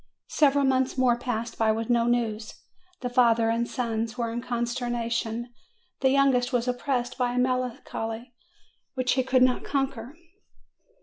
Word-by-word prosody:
Several 285 Hz, -2 st, +3 dB
months 260 Hz, 0 st, +1 dB
more 255 Hz, -2 st, +4 dB
passed 235 Hz, -1 st, -4 dB
by 220 Hz, -1 st, +3 dB
with 225 Hz, +1 st, -2 dB
no 235 Hz, -1 st, +2 dB
news. 230 Hz, -2 st, -1 dB, 0.5 s
The 250 Hz, -, -2 dB
father 230 Hz, -2 st, +4 dB
and 235 Hz, +1 st, 0 dB
sons 230 Hz, -1 st, -3 dB
were 235 Hz, -2 st, -1 dB
in 240 Hz, +1 st, -3 dB
consternation; 240 Hz, -1 st, -2 dB, 0.5 s
the 265 Hz, -, +3 dB
youngest 265 Hz, -2 st, +3 dB
was 245 Hz, -1 st, 0 dB
oppressed 250 Hz, 0 st, -2 dB
by 245 Hz, -1 st, +1 dB
a -, -, -3 dB
melancholy 250 Hz, -2 st, -2 dB, 0.6 s
which 255 Hz, -1 st, 0 dB
he 260 Hz, -, +3 dB
could 255 Hz, 0 st, +3 dB
not 255 Hz, -1 st, +2 dB
conquer. 270 Hz, -2 st, -3 dB
245 Hz, 145 wpm, -26 LUFS, 230-255 Hz, 0.6 s, more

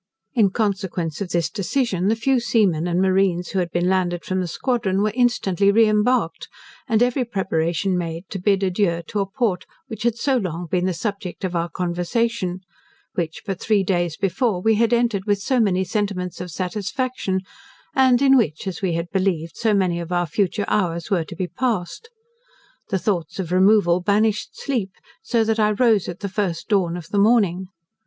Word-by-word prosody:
In 220 Hz, -7 st, +4 dB
consequence 190 Hz, -5 st, -2 dB
of 195 Hz, -, -3 dB
this 170 Hz, -2 st, +1 dB
decision, 200 Hz, 0 st, -1 dB
the 220 Hz, -, +3 dB
few 255 Hz, +3 st, +1 dB
seamen 200 Hz, -9 st, +1 dB
and 175 Hz, 0 st, 0 dB
marines 185 Hz, -2 st, +1 dB
who 195 Hz, -, -1 dB
had 175 Hz, -1 st, -1 dB
been 175 Hz, +1 st, 0 dB
landed 180 Hz, -2 st, 0 dB
from 185 Hz, 0 st, -1 dB
the 180 Hz, -, -2 dB
squadron, 200 Hz, -1 st, 0 dB
were 215 Hz, -, +1 dB
instantly 200 Hz, -6 st, +2 dB
reimbarked, 215 Hz, -5 st, +2 dB, 0.4 s
and 225 Hz, -2 st, +3 dB
every 250 Hz, +1 st, +1 dB
preparation 190 Hz, -4 st, -1 dB
made 170 Hz, 0 st, -4 dB
to 195 Hz, -, -4 dB
bid 195 Hz, +1 st, +2 dB
adieu 180 Hz, -3 st, 0 dB
to 210 Hz, -, -3 dB
a 195 Hz, -, 0 dB
port 205 Hz, -4 st, -1 dB, 0.2 s
which 220 Hz, -3 st, -7 dB
had 235 Hz, 0 st, +1 dB
so 265 Hz, +2 st, +1 dB
long 180 Hz, -5 st, -3 dB
been 180 Hz, +2 st, 0 dB
the 185 Hz, -2 st, 0 dB
subject 200 Hz, -1 st, -5 dB
of 180 Hz, -2 st, -2 dB
our 170 Hz, 0 st, -1 dB
conversation; 180 Hz, +2 st, -1 dB, 0.5 s
which 165 Hz, -3 st, -3 dB
but 195 Hz, -2 st, -3 dB
three 210 Hz, -3 st, +2 dB
days 175 Hz, -4 st, 0 dB
before 195 Hz, +1 st, 0 dB
we 220 Hz, +4 st, +3 dB
had 230 Hz, +2 st, +2 dB
entered 235 Hz, -5 st, +1 dB
with 205 Hz, -2 st, +2 dB
so 250 Hz, +6 st, 0 dB
many 190 Hz, -4 st, +2 dB
sentiments 190 Hz, -2 st, -3 dB
of 180 Hz, -, -6 dB
satisfaction; 190 Hz, -, -2 dB, 0.5 s
and 260 Hz, -1 st, +4 dB
in 270 Hz, -1 st, +6 dB
which, 205 Hz, -, +1 dB
as 190 Hz, -3 st, -4 dB
we 185 Hz, -3 st, 0 dB
had 170 Hz, +1 st, -2 dB
believed, 175 Hz, -5 st, -1 dB
so 225 Hz, -, +1 dB
many 185 Hz, -4 st, +1 dB
of 170 Hz, +1 st, -6 dB
our 175 Hz, 0 st, +1 dB
future 200 Hz, +5 st, -1 dB
hours 170 Hz, -4 st, -1 dB
were 180 Hz, -4 st, +2 dB
to -, -, -10 dB
be 185 Hz, -, -2 dB
passed. 230 Hz, -, -3 dB, 0.8 s
The 190 Hz, -, +1 dB
thoughts 175 Hz, -5 st, -2 dB
of 180 Hz, -3 st, -4 dB
removal 185 Hz, -1 st, +4 dB
banished 210 Hz, +2 st, 0 dB
sleep, 225 Hz, -9 st, -2 dB, 0.3 s
so 235 Hz, -8 st, +1 dB
that 225 Hz, 0 st, 0 dB
I 210 Hz, -1 st, +4 dB
rose 220 Hz, -4 st, +2 dB
at 175 Hz, -, -7 dB
the 200 Hz, -, -2 dB
first 185 Hz, -4 st, -3 dB
dawn 180 Hz, -5 st, +1 dB
of 170 Hz, -1 st, -9 dB
the 205 Hz, -, 0 dB
morning. 200 Hz, -4 st, +3 dB
195 Hz, 190 wpm, -22 LUFS, 175-220 Hz, 0.8 s, in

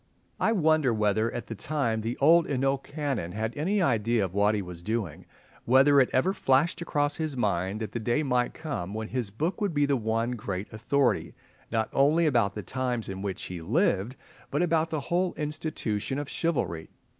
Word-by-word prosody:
I 220 Hz, -, +2 dB
wonder 155 Hz, -, +3 dB
whether, 110 Hz, +1 st, +1 dB
at 120 Hz, -, -5 dB
the -, -, -6 dB
time, 115 Hz, -2 st, -1 dB
the 115 Hz, +3 st, -3 dB
old 165 Hz, +4 st, +5 dB
Hainault 135 Hz, 0 st, +1 dB
Canon 135 Hz, -, -3 dB
had 110 Hz, +2 st, -3 dB
any 185 Hz, +7 st, +1 dB
idea 115 Hz, -, +2 dB
of 90 Hz, -, -7 dB
what 105 Hz, +2 st, +3 dB
he 105 Hz, -, -1 dB
was 90 Hz, -2 st, -8 dB
doing—whether 125 Hz, +6 st, +1 dB
it 130 Hz, -, +4 dB
ever 160 Hz, +9 st, +2 dB
flashed 145 Hz, -1 st, +2 dB
across 145 Hz, -3 st, 0 dB
his 155 Hz, -4 st, -3 dB
mind 100 Hz, -1 st, -1 dB
that 110 Hz, -2 st, -4 dB
the 120 Hz, -, -3 dB
day 120 Hz, +7 st, 0 dB
might 125 Hz, -3 st, 0 dB
come 120 Hz, -, -5 dB
when 110 Hz, 0 st, -4 dB
his 120 Hz, -4 st, -2 dB
book 160 Hz, -, -3 dB
would 200 Hz, -6 st, 0 dB
be 145 Hz, 0 st, +3 dB
the 140 Hz, -1 st, +2 dB
one 115 Hz, 0 st, -1 dB
great 105 Hz, -5 st, -5 dB
authority, 125 Hz, +5 st, 0 dB, 0.4 s
not 110 Hz, -1 st, +1 dB
only 150 Hz, +5 st, +4 dB
about 115 Hz, -9 st, +2 dB
the 105 Hz, -, -5 dB
times 125 Hz, 0 st, -2 dB
in 95 Hz, 0 st, -5 dB
which 100 Hz, -2 st, -4 dB
he 90 Hz, -2 st, -6 dB
lived, 120 Hz, -, +1 dB, 0.3 s
but 145 Hz, +5 st, 0 dB
about 165 Hz, -1 st, +1 dB
the 155 Hz, -2 st, -2 dB
whole 175 Hz, +5 st, 0 dB
institution 145 Hz, -6 st, -2 dB
of 145 Hz, -1 st, -3 dB
chivalry? 135 Hz, -, -2 dB
125 Hz, 190 wpm, -27 LUFS, 110-150 Hz, 0.4 s, old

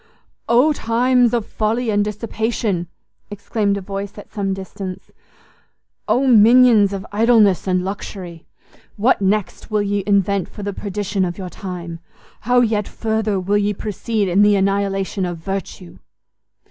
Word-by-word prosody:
"Oh 250 Hz, +7 st, +4 dB
times 245 Hz, 0 st, +2 dB
of 235 Hz, -3 st, -1 dB
folly 225 Hz, +2 st, -1 dB
and 205 Hz, 0 st, +2 dB
dissipation!" 210 Hz, -3 st, -2 dB, 0.4 s
exclaimed 205 Hz, 0 st, -1 dB
a -, -, -5 dB
voice 195 Hz, +1 st, -6 dB
at 205 Hz, -, -12 dB
some 200 Hz, -2 st, -2 dB
distance; 190 Hz, 0 st, -7 dB, 1.0 s
"Oh 265 Hz, +3 st, +2 dB
mignons 230 Hz, -3 st, +6 dB
of 195 Hz, -1 st, -5 dB
idleness 210 Hz, -3 st, +3 dB
and 185 Hz, -1 st, +1 dB
luxury! 185 Hz, -4 st, -7 dB, 0.5 s
What 220 Hz, +2 st, +2 dB
next 200 Hz, +2 st, -1 dB
will 210 Hz, -1 st, +1 dB
ye 200 Hz, 0 st, -1 dB
invent 200 Hz, -1 st, +1 dB
for 205 Hz, -, -9 dB
the 200 Hz, 0 st, -3 dB
perdition 200 Hz, 0 st, -2 dB
of 175 Hz, -1 st, -3 dB
your 185 Hz, -2 st, -7 dB
time! 175 Hz, -4 st, -7 dB, 0.5 s
How 245 Hz, 0 st, +5 dB
yet 215 Hz, -3 st, 0 dB
further 220 Hz, -3 st, -1 dB
will 200 Hz, +3 st, +1 dB
ye 205 Hz, 0 st, 0 dB
proceed 215 Hz, +1 st, -2 dB
in 185 Hz, +3 st, +3 dB
the 205 Hz, 0 st, +5 dB
annihilation 195 Hz, 0 st, 0 dB
of 175 Hz, -1 st, -3 dB
virtue!" 160 Hz, -, -6 dB
205 Hz, 145 wpm, -19 LUFS, 195-220 Hz, 1.0 s, mignons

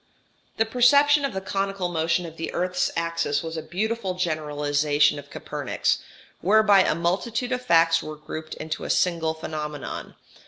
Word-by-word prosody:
] -, -, -39 dB
This 225 Hz, -, +2 dB
perception 285 Hz, +5 st, +5 dB
of 275 Hz, -, -3 dB
the 190 Hz, -, -3 dB
conical 195 Hz, -1 st, -2 dB
motion 170 Hz, +1 st, 0 dB
of 160 Hz, -1 st, -9 dB
the 165 Hz, -, -4 dB
earth's 180 Hz, +1 st, 0 dB
axis 165 Hz, -3 st, -1 dB
was 165 Hz, 0 st, -5 dB
a 160 Hz, -, -3 dB
beautiful 200 Hz, +2 st, -2 dB
generalization 150 Hz, -4 st, +1 dB
of 145 Hz, 0 st, -12 dB
Copernik's, -, -, -2 dB, 0.4 s
whereby 205 Hz, +1 st, +5 dB
a 155 Hz, -, +2 dB
multitude 215 Hz, +9 st, -1 dB
of 250 Hz, 0 st, -1 dB
facts 165 Hz, -6 st, +4 dB
were 155 Hz, -, -7 dB
grouped 155 Hz, +1 st, -7 dB
into 155 Hz, 0 st, -5 dB
a -, -, -5 dB
single 165 Hz, -3 st, +1 dB
phenomenon. 150 Hz, -2 st, -6 dB
170 Hz, 160 wpm, -24 LUFS, 155-200 Hz, 0.4 s, perception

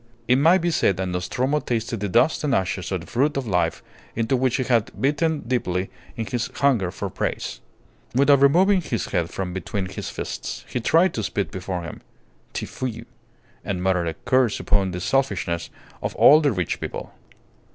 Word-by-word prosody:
It 125 Hz, -, +5 dB
may 165 Hz, +6 st, +6 dB
be 175 Hz, -1 st, 0 dB
said 95 Hz, -, +2 dB
that 95 Hz, -, -1 dB
Nostromo 125 Hz, +11 st, 0 dB
tasted 115 Hz, -3 st, -2 dB
the 100 Hz, 0 st, -2 dB
dust 135 Hz, -, +3 dB
and 140 Hz, -3 st, +2 dB
ashes 95 Hz, -1 st, -1 dB
of 95 Hz, -3 st, -1 dB
the -, -, -10 dB
fruit 140 Hz, +4 st, 0 dB
of 135 Hz, -, -2 dB
life 90 Hz, -6 st, 0 dB, 0.3 s
into 115 Hz, +3 st, +1 dB
which 130 Hz, -1 st, +1 dB
he 130 Hz, -, 0 dB
had 120 Hz, -4 st, +2 dB
bitten 150 Hz, +3 st, +1 dB
deeply 95 Hz, -7 st, -1 dB, 0.3 s
in 115 Hz, -, -2 dB
his 120 Hz, 0 st, -2 dB
hunger 125 Hz, -10 st, +2 dB
for 100 Hz, +2 st, -4 dB
praise. -, -, -3 dB, 0.6 s
Without 140 Hz, +1 st, +5 dB
removing 185 Hz, +7 st, +5 dB
his 115 Hz, -, -2 dB
head 85 Hz, -1 st, -1 dB
from 90 Hz, -2 st, -4 dB
between 95 Hz, +2 st, -3 dB
his -, -, -5 dB
fists, -, -, -5 dB
he -, -, -2 dB
tried 165 Hz, +10 st, +3 dB
to 110 Hz, -, -2 dB
spit 100 Hz, 0 st, -2 dB
before 90 Hz, -1 st, -4 dB
him 85 Hz, -, -8 dB, 0.5 s
"Tfui" 115 Hz, -3 st, -4 dB, 0.6 s
and 90 Hz, -3 st, -3 dB
muttered 90 Hz, -2 st, +1 dB
a 80 Hz, -, -3 dB
curse 130 Hz, -4 st, +3 dB
upon 100 Hz, -2 st, +1 dB
the 90 Hz, 0 st, -4 dB
selfishness 90 Hz, -8 st, 0 dB, 0.3 s
of -, -, -3 dB
all 155 Hz, +2 st, +7 dB
the 145 Hz, -3 st, +3 dB
rich 90 Hz, -7 st, -2 dB
people. -, -, -6 dB
115 Hz, 185 wpm, -23 LUFS, 95-140 Hz, 0.6 s, all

